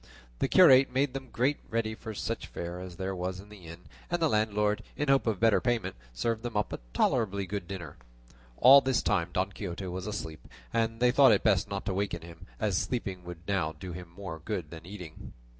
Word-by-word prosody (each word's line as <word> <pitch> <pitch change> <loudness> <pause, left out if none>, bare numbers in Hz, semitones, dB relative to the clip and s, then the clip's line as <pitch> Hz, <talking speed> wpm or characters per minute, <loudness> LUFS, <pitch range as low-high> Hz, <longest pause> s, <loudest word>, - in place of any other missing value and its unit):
The - - +2
curate 130 0 +7
made 130 +1 +1
them 135 -2 -6
get 135 +6 +1
ready 110 -1 -1 0.2
such - - -3
fare 85 +1 -6
as 90 -1 -8
there 95 +2 -3
was 90 +1 -3
in 100 +2 -12
the 100 -5 -13
inn, 85 +2 -10 0.3
and 175 - 0
the 165 - +3
landlord, 105 -1 +1 0.2
in 150 -1 -1
hope 135 -3 +3
of 105 -4 0
better 115 -2 +4
payment, 120 - -1 0.2
served 110 - -1
them 120 -2 -4
up 105 -4 -1
a - - -4
tolerably 100 - +1
good 95 -1 -5
dinner. 85 -6 -7 0.6
All 135 +3 +9
this 130 -1 +1
time 85 - +1
Don 95 +2 -1
Quixote 95 -2 -5
was 90 +1 -5
asleep, 80 -7 -6 0.3
and 115 0 0
they 125 0 +5
thought 135 -1 +7
it 105 - +3
best 100 -2 +3
not 100 -1 -4
to 100 - -1
waken 95 -3 -2
him, 85 +2 -12
as 105 -5 +1
sleeping 95 -7 -3
would 85 -1 -9
now 95 -6 0
do 90 +4 -8
him 90 0 -8
more 85 -2 -7
good 90 -8 -4
than 85 0 -10
eating. 90 -6 -9
100 Hz, 210 wpm, -29 LUFS, 90-115 Hz, 0.6 s, All